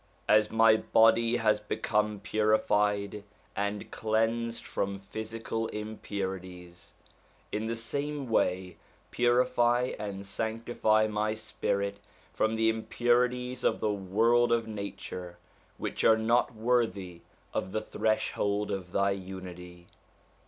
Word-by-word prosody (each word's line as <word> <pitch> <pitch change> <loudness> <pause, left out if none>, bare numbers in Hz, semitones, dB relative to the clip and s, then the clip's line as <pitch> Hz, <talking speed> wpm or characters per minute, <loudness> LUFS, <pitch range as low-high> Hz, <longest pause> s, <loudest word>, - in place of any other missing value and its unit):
as 105 0 +5
my 110 0 +5
body 115 +2 +4
has 110 -2 +2
become 105 0 -1
purified 105 -1 +1 0.3
and 100 +1 -3
cleansed 115 +1 0
from 100 0 -2
physical 110 +3 -4
impurities, 95 -5 -6 0.6
in 110 +1 -2
the 115 - -1
same 140 +4 -3
way 90 -4 0 0.3
purify 120 0 +2
and 100 -1 -5
sanctify 110 +1 +1
my 110 0 -1
spirit 100 -2 -2 0.3
from 110 +1 +1
the 110 0 +2
impurities 125 +2 +1
of - - +2
the 105 - +1
world 115 +5 +2
of 115 -1 +2
nature, 95 -4 -6 0.4
which - - -3
are 110 - +6
not 115 +2 +2
worthy 110 -7 0 0.3
of 95 - -2
the 110 - -1
Threshold 105 -1 -1
of 90 -2 -4
Thy 100 0 +2
Unity 90 -2 -8
110 Hz, 110 wpm, -29 LUFS, 100-115 Hz, 0.6 s, are